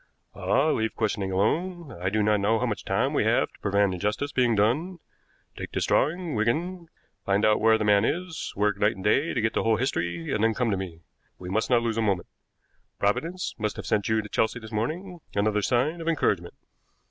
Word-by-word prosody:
"Ah, 155 Hz, +3 st, +1 dB
leave 110 Hz, -4 st, -1 dB
questioning 100 Hz, -3 st, -1 dB
alone. 165 Hz, -, -1 dB
I 90 Hz, -3 st, -3 dB
do 105 Hz, +2 st, +1 dB
not 105 Hz, 0 st, +3 dB
know 105 Hz, +3 st, +2 dB
how -, -, 0 dB
much -, -, -3 dB
time -, -, 0 dB
we -, -, +2 dB
have -, -, +2 dB
to -, -, -21 dB
prevent 100 Hz, -1 st, +2 dB
injustice 105 Hz, +10 st, -2 dB
being 125 Hz, -4 st, +2 dB
done. 140 Hz, -, +1 dB, 0.6 s
Take -, -, -7 dB
this -, -, 0 dB
drawing, 170 Hz, +2 st, +1 dB
Wigan, 165 Hz, -, -1 dB, 0.4 s
find 100 Hz, +2 st, +2 dB
out 110 Hz, 0 st, +3 dB
where 110 Hz, 0 st, +5 dB
the 110 Hz, -, -2 dB
man 105 Hz, -1 st, +4 dB
is, 175 Hz, +5 st, -2 dB
work 105 Hz, 0 st, +1 dB
night 105 Hz, +3 st, +2 dB
and 95 Hz, -, -9 dB
day 135 Hz, -, +2 dB
to 120 Hz, -, +1 dB
get 110 Hz, 0 st, 0 dB
the -, -, +1 dB
whole 115 Hz, -1 st, +2 dB
history, 85 Hz, -9 st, -2 dB
and 110 Hz, -, 0 dB
then 115 Hz, -1 st, +2 dB
come 125 Hz, -3 st, 0 dB
to -, -, +1 dB
me. 90 Hz, -3 st, -6 dB, 0.4 s
We 90 Hz, -, -8 dB
must 110 Hz, +4 st, 0 dB
not 120 Hz, -2 st, +3 dB
lose 115 Hz, -1 st, -1 dB
a -, -, +2 dB
moment. 100 Hz, -5 st, 0 dB, 0.7 s
Providence 165 Hz, -, -1 dB
must 105 Hz, -1 st, -1 dB
have -, -, -7 dB
sent 105 Hz, -1 st, 0 dB
you 110 Hz, -1 st, +2 dB
to 105 Hz, -, -9 dB
Chelsea 110 Hz, +2 st, 0 dB
this 110 Hz, -2 st, -11 dB
morning 170 Hz, -, -3 dB, 0.2 s
another 105 Hz, +1 st, +1 dB
sign 135 Hz, +10 st, 0 dB
of 165 Hz, -, -6 dB
encouragement." 100 Hz, -, 0 dB
110 Hz, 215 wpm, -26 LUFS, 100-140 Hz, 0.7 s, where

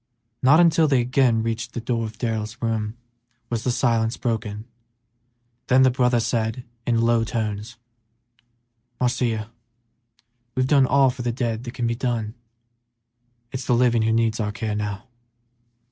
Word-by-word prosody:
Not 145 Hz, +5 st, +6 dB
until 165 Hz, -2 st, +5 dB
they 135 Hz, -3 st, +3 dB
again 120 Hz, -2 st, +2 dB
reached 115 Hz, +1 st, -3 dB
the -, -, -1 dB
door 115 Hz, 0 st, -1 dB
of 110 Hz, -1 st, -8 dB
Darrell's 110 Hz, -1 st, -3 dB
room 110 Hz, -1 st, -2 dB, 0.5 s
was 115 Hz, -1 st, -1 dB
the -, -, 0 dB
silence 115 Hz, -1 st, +1 dB
broken; 110 Hz, -2 st, -3 dB, 1.0 s
then 130 Hz, +1 st, +5 dB
the 130 Hz, -, +5 dB
brother 125 Hz, -1 st, +2 dB
said, 115 Hz, +1 st, -1 dB, 0.2 s
in 115 Hz, -1 st, +2 dB
low 115 Hz, 0 st, +3 dB
tones, 110 Hz, 0 st, -4 dB, 1.2 s
"Marcia, 115 Hz, -3 st, -1 dB, 1.0 s
we've 130 Hz, 0 st, +2 dB
done 135 Hz, -1 st, +4 dB
all 135 Hz, 0 st, +4 dB
for 125 Hz, -, -8 dB
the 120 Hz, 0 st, -1 dB
dead 115 Hz, -1 st, -3 dB
that 120 Hz, +1 st, -7 dB
can 120 Hz, -, -2 dB
be 115 Hz, -, +1 dB
done; 115 Hz, -3 st, -2 dB, 1.2 s
it's 130 Hz, 0 st, -5 dB
the 125 Hz, -, +3 dB
living 120 Hz, -1 st, +3 dB
who 110 Hz, +1 st, +2 dB
needs 115 Hz, -1 st, +1 dB
our 105 Hz, -2 st, -1 dB
care 105 Hz, +1 st, -3 dB
now." 105 Hz, -1 st, -3 dB
115 Hz, 150 wpm, -23 LUFS, 110-125 Hz, 1.2 s, Not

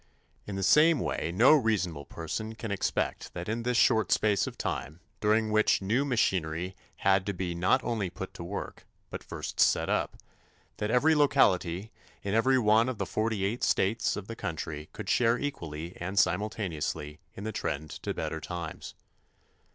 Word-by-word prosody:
In 100 Hz, -, -4 dB
the 95 Hz, -, -2 dB
same 150 Hz, -, +5 dB
way, 85 Hz, -, -2 dB
no 115 Hz, -, +6 dB
reasonable 95 Hz, -, +1 dB
person 110 Hz, +7 st, -5 dB
can 110 Hz, -2 st, -5 dB
expect 100 Hz, -, -2 dB
that 90 Hz, 0 st, -5 dB
in 115 Hz, +2 st, -2 dB
this 125 Hz, 0 st, 0 dB
short 110 Hz, -4 st, +3 dB
space 105 Hz, -3 st, +2 dB
of -, -, -7 dB
time, 75 Hz, +5 st, -4 dB, 0.2 s
during 110 Hz, +1 st, +2 dB
which 110 Hz, 0 st, +3 dB
new 110 Hz, +8 st, +1 dB
machinery 95 Hz, -, 0 dB, 0.3 s
had 95 Hz, 0 st, +4 dB
to 100 Hz, -, 0 dB
be 90 Hz, -1 st, -3 dB
not 90 Hz, +10 st, +2 dB
only 110 Hz, -5 st, -1 dB
put 95 Hz, +1 st, -7 dB
to -, -, -8 dB
work, 100 Hz, +4 st, -6 dB, 0.2 s
but -, -, -6 dB
first -, -, -6 dB
set -, -, +3 dB
up, -, -, 0 dB, 0.6 s
that 105 Hz, -, -2 dB
every 135 Hz, +7 st, +4 dB
locality 105 Hz, -, +2 dB, 0.3 s
in 100 Hz, -, -2 dB
every 130 Hz, +4 st, +4 dB
one 115 Hz, +1 st, +4 dB
of 130 Hz, -, -4 dB
the -, -, -2 dB
forty 110 Hz, -3 st, -1 dB
eight 110 Hz, +5 st, -2 dB
states 105 Hz, +5 st, +1 dB
of 100 Hz, -, -6 dB
the 115 Hz, -, -6 dB
country 80 Hz, -5 st, -5 dB
could 105 Hz, -, -8 dB
share 115 Hz, +3 st, +3 dB
equally 85 Hz, -, -5 dB
and 95 Hz, +3 st, -5 dB
simultaneously 90 Hz, -6 st, -1 dB, 0.2 s
in 100 Hz, -, -7 dB
the 110 Hz, -, -3 dB
trend 80 Hz, -6 st, -3 dB
to -, -, -3 dB
better -, -, -3 dB
times. 85 Hz, -3 st, -6 dB
100 Hz, 175 wpm, -29 LUFS, 90-115 Hz, 0.6 s, no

